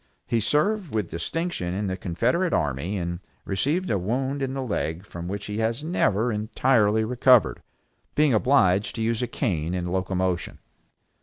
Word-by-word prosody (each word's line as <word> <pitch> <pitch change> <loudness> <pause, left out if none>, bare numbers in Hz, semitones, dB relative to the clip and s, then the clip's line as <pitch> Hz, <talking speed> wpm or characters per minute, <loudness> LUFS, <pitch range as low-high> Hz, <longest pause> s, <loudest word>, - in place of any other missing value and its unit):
He 115 - +1
served 155 - +1
with 105 -5 -2
distinction 90 - -3
in 105 +2 -2
the 95 -1 -1
confederate 120 - 0
army, 75 +8 -1
and 85 -1 -3 0.3
received 145 - 0
a 100 - +1
wound 130 +8 -1
in 135 0 -2
the 135 - -2
leg 90 -6 -3
from 85 -2 -7
which 100 +2 -4
he 105 +2 -4
has 115 +5 -1
never 120 - +1
entirely 110 0 +2
recovered, 125 0 +4 0.5
being 150 -3 +4
obliged 105 -5 +3
to 115 - -2
use 115 +1 0
a 125 - 0
cane 90 - -1
in 90 -1 -2
locomotion. 95 -1 -1
110 Hz, 160 wpm, -25 LUFS, 95-130 Hz, 0.5 s, recovered